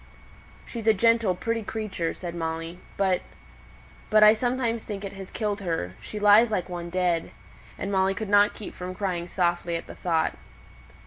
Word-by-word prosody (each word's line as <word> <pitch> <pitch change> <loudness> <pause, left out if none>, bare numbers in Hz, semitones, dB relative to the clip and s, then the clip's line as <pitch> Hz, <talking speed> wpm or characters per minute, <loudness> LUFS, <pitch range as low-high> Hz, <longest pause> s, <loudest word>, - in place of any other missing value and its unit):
"She's 230 -2 -6
a 220 - +6
gentle, 230 -2 +3
pretty 230 +4 -2
creature," 205 -6 -3
said 175 -2 -6
Molly. 165 +1 -4 0.2
"But 190 -2 +2 0.9
but 215 -1 +6
I 215 0 +9
sometimes 235 0 -1
think 205 -2 -5
it 195 - -6
has 195 -1 -9
killed 210 -2 -2
her; 165 - -2
she 215 - -7
lies 210 +3 +6
like 200 -5 -1
one 175 -1 -5
dead." 175 -2 0 0.5
And 195 - -3
Molly 190 0 +2
could 220 +2 -4
not 205 +1 +4
keep 210 - -8
from 180 0 -6
crying 180 -4 -2
softly 175 -1 0
at 165 - -4
the - - -9
thought. 165 -3 0
195 Hz, 175 wpm, -26 LUFS, 175-215 Hz, 0.9 s, I